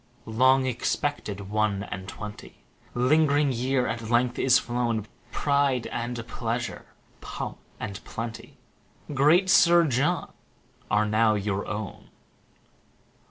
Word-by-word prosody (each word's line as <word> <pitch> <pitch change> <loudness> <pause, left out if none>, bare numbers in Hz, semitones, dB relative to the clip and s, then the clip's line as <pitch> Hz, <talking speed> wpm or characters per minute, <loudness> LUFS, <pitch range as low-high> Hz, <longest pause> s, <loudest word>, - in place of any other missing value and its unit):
One - - -33
and 110 - -8
Twenty - - -5 0.2
LONG 135 -1 0
EXPECTED 125 -3 -2
one 100 0 -1
and 95 -1 -7
twenty, 105 0 -9 0.3
Ling'ring 145 +2 +3
year, 125 +1 0
at 115 -1 -4
length 120 +1 +2
is 125 -2 +5
flown: 120 -3 -1 0.3
Pride 140 -4 +1
and 120 0 -4
pleasure, 115 0 -4 0.3
pomp - - -6 0.2
and 100 -3 -6
plenty, 115 0 -7 0.6
Great......., 170 +7 +5 1.2
are 105 0 +3
now 110 0 +3
your 100 -1 -2
own. 105 -2 -6
120 Hz, 115 wpm, -26 LUFS, 105-130 Hz, 1.2 s, is